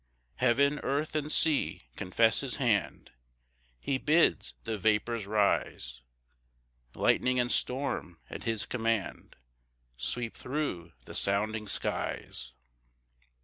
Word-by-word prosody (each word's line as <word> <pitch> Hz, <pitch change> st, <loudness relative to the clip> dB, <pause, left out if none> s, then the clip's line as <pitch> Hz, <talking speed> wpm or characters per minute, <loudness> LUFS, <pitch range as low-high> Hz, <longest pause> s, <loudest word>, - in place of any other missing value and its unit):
3 130 Hz, -, +3 dB
Heaven, 140 Hz, +4 st, +3 dB
earth, 145 Hz, +3 st, -1 dB
and 155 Hz, 0 st, -1 dB
sea, 135 Hz, -, +2 dB
confess 110 Hz, +5 st, +2 dB
his 135 Hz, -3 st, -1 dB
hand; 110 Hz, -, 0 dB, 0.7 s
He 130 Hz, -, -1 dB
bids 150 Hz, -, +3 dB
the 110 Hz, -1 st, -2 dB
vapours 110 Hz, +1 st, +1 dB
rise; 100 Hz, -, 0 dB, 0.9 s
Lightning 125 Hz, 0 st, +2 dB
and 120 Hz, 0 st, +1 dB
storm 125 Hz, -, -1 dB
at -, -, -7 dB
his 115 Hz, -3 st, 0 dB
command 115 Hz, -4 st, -2 dB, 0.6 s
Sweep 120 Hz, -, -2 dB
thro' 125 Hz, -, -3 dB
the -, -, -10 dB
sounding 105 Hz, +2 st, 0 dB
skies. 60 Hz, -9 st, -3 dB
115 Hz, 105 wpm, -30 LUFS, 100-135 Hz, 0.9 s, 3